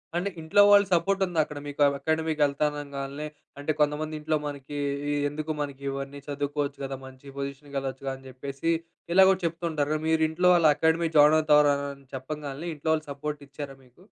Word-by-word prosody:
అంటే 180 +3 0
ఇంట్లో 160 +6 +4
వాళ్ళు 205 0 +7
సపోర్ట్ 195 +3 +2
ఉందా 175 -3 -2
అక్కడ 150 -1 -8
మీకు? 145 0 -5 0.2
అకాడమీకెళ్తా 155 -1 +1 0.2
అనగాల్నే 140 +1 -5 0.3
అంటే 145 +2 -1
కొంతమంది 150 +1 +1
ఇంట్లో 155 +1 0
మనకి 145 0 -7 0.3
ఇ - - +1 0.2
"ఎందుకు 155 +2 -4
మనకి 140 -1 -5
ఇవన్నీ 135 +1 -5
చదువుకోవచ్చు 145 0 -2
కదా. 135 0 -4
మంచి 130 +1 -12
పొజిషన్‌కి 140 +1 -6
వెళ్ళొచ్చుగా" 135 0 -3
అని 135 0 -14
చెప్పేసి 140 +5 -3 0.4
ఇలాగ 190 +1 +7
చెప్తుంటారుగా 160 -3 -1
మీరు 160 0 +3
ఇంట్లో 175 +3 +1
వాళ్ళు 170 -3 +5
అకాడమీ 160 +1 +2
జాయిన్ 150 +1 +7
అవుతారు 150 -1 +5
అని 140 -1 -6
చెప్పగానే 145 +3 -5
ఇంట్లో 150 +2 -3
వాళ్ళు 155 -1 -1
సపోర్ట్ 150 +1 -5
ఇచ్చారా 140 -1 -7
మీకు? 125 +6 -23
145 Hz, 165 wpm, -27 LUFS, 140-160 Hz, 0.4 s, వాళ్ళు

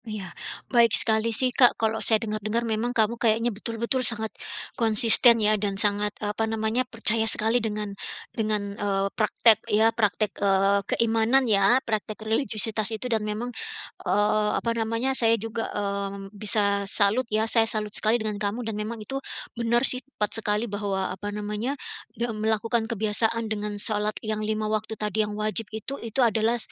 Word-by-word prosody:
Iya 215 -3 -7 0.5
baik 235 -3 +5
sekali 220 +1 +2
sih 250 +3 +1
Kak 245 -1 +4
kalau 220 0 -2
saya 220 - +3
dengar-dengar 215 +2 -3
memang 225 +1 -2
kamu 230 -1 -1
kayaknya 230 +1 +1
betul-betul 230 +4 -2
sangat, 220 -2 +1 0.4
konsisten 230 +1 +6
ya 215 -1 +3
dan 200 -2 -2
sangat, 205 0 +4
eee, 210 -1 -3
apa 220 +1 -2
namanya 220 +2 -1
percaya 225 -1 +5
sekali 225 +2 +5
dengan 210 -2 -4 0.4
dengan, 210 -2 -2
eee, 195 -1 -1
praktek 220 +1 +4
ya 220 +2 +3
praktek, 210 -1 -1
eee, 195 0 +2
keimanan 230 +3 +2
ya 205 +1 +3
praktek 215 -1 -4
religiusitas 220 -2 0
itu 220 +2 -6
dan 220 - 0
memang, 215 +4 -5 0.5
eee, 210 +1 0
apa 230 - -2
namanya 230 +3 -2
saya 230 -3 +3
juga, 225 +1 -5
mmm, 200 -1 -5
bisa 205 -1 0
salut 220 +4 +1
ya 215 +1 0
saya 225 0 +2
salut 210 -2 -3
sekali 220 +2 +1
dengan 215 -2 -4
kamu 215 +4 -3
dan 225 - -4
memang 225 +2 -5
itu 270 +3 -5 0.3
benar 235 +1 0
sih 255 -1 +5
tepat 240 -7 -4
sekali 210 0 -1
bahwa 200 -3 -3
apa 200 +2 -7
namanya 210 +6 -4 0.4
dem 230 -2 -4
melakukan 225 +1 -1
kebiasaan 225 +1 +1
dengan 210 0 -5
shalat 210 0 0
yang 215 0 -2
5 215 0 -2
waktu 215 0 -3
tadi 210 0 -1
yang 210 -1 -4
wajib 215 0 -2
itu 220 +6 -7
itu 235 +2 0
adalah 225 +1 0
220 Hz, 165 wpm, -24 LUFS, 210-230 Hz, 0.5 s, konsisten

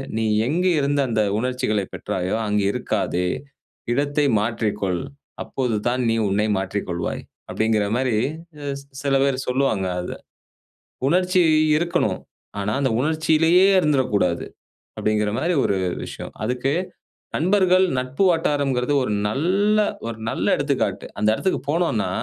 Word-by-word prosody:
"நீ 110 - 0 0.2
எங்க 170 +7 0
இருந்து 140 0 +1
அந்த 110 -2 +1 0.2
உணர்ச்சிகளைப் 125 -5 -1
பெற்றாயோ, 95 +1 -2
அங்கு 105 0 +1
இருக்காதே. 90 -2 -1 0.6
இடத்தை 145 +3 +1
மாற்றிக்கொள். 105 -4 -1 0.4
அப்போது 125 -4 -2
தான் 125 +1 +1
நீ 115 - +2
உன்னை 105 +2 +1
மாற்றிக்கொள்வாய்." 95 -3 -3 0.3
அப்டிங்கற 110 -1 +1
மாரி 125 -3 +1 0.9
சில 140 -1 +1
பேர் 135 -2 +1
சொல்லுவாங்க 125 -7 +1
அத. 90 - -4 1.0
உணர்ச்சி 180 +2 +3 0.4
இருக்கணும். 170 +2 0 0.4
ஆனா, 100 +1 -1
அந்த 130 - +1
உணர்ச்சியிலேயே 160 +4 +3
இருந்திறக்கூடாது. 115 - +1 0.5
அப்டிங்கற 105 -1 +1
மாரி 170 +6 +1
ஒரு 100 - +1 0.3
விஷயம். - - -8
அதுக்கு 125 +4 -1 0.6
நண்பர்கள், 185 +2 +4
நட்பு 130 +8 0
வட்டாரம்ங்கிறது 145 -5 +1
ஒரு 110 - -1 0.2
நல்ல 190 - +2 0.3
ஒரு 115 - -4
நல்ல - - -2
எடுத்துக்காட்டு. - - -1
அந்த 105 - +2
எடத்துக்கு 190 +11 -1
போனோம்னா, 165 -9 0
130 Hz, 115 wpm, -22 LUFS, 105-155 Hz, 1.0 s, நண்பர்கள்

